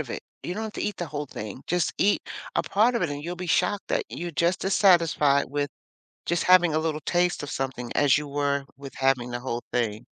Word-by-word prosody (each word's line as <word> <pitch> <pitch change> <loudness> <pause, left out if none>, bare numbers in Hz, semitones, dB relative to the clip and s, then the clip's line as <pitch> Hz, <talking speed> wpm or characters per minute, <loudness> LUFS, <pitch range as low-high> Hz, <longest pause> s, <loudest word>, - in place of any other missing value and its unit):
of - - -5
it. - - -5 0.2
You 180 - -3
don't 220 - -4
have 215 - -5
to - - -5
eat 210 - -2
the 175 - -3
whole 145 -1 -4
thing, 110 +2 -7
just 175 -1 0
eat 205 - +3 0.3
a - - +3
part 225 +5 +2
of 235 - 0
it, 160 - 0
and 145 0 -5
you'll 175 +1 -4
be 180 0 -5
shocked 180 +4 +1
that - - 0
you're 175 0 -5
just 170 +5 +1
as 195 - +1
satisfied 165 -7 +4
with 145 0 -1 0.6
just 170 0 0
having 180 -3 +5
a 155 - +3
little 155 -1 -2
taste 175 -2 +1
of 145 - -5
something 130 -2 -4
as 145 -1 +5
you 150 -1 -4
were 140 -1 -1
with 140 -2 -9
having 130 -2 +1
the 120 - -3
whole 120 -2 -3
thing. 115 -1 -1
150 Hz, 240 wpm, -26 LUFS, 135-180 Hz, 0.6 s, having